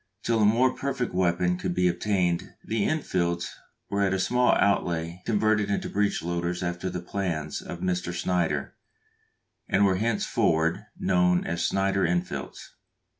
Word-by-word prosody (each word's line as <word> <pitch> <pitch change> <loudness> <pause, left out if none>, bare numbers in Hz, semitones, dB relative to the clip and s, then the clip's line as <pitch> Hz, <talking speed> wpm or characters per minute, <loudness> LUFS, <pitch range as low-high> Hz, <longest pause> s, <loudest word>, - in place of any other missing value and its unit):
Till 115 -1 +1
a - - +5
more 120 +5 +4
perfect 135 -5 -3
weapon 90 0 +1
could 90 - -2
be 90 0 +3
obtained 90 -2 0
the 110 -2 0
Enfields 85 - -1 0.4
were 100 0 0
at 95 -1 +2
a - - -1
small 125 +5 +3
outlay 85 -3 0
converted 110 -1 +2
into 100 - -2
breech 100 -4 0
loaders 85 +1 -2
after 90 +1 -2
the 90 -1 -5
plans 85 -5 -3
of 85 - -8
Mr. 90 -1 -1
Snider, 85 -5 -1 1.0
and 100 +1 +4
were 95 -2 +2
henceforward 85 -6 +1
known 90 0 +2
as 85 +1 -2
Snider 95 0 +1
Enfields. 90 +1 -3
90 Hz, 145 wpm, -26 LUFS, 85-100 Hz, 1.0 s, a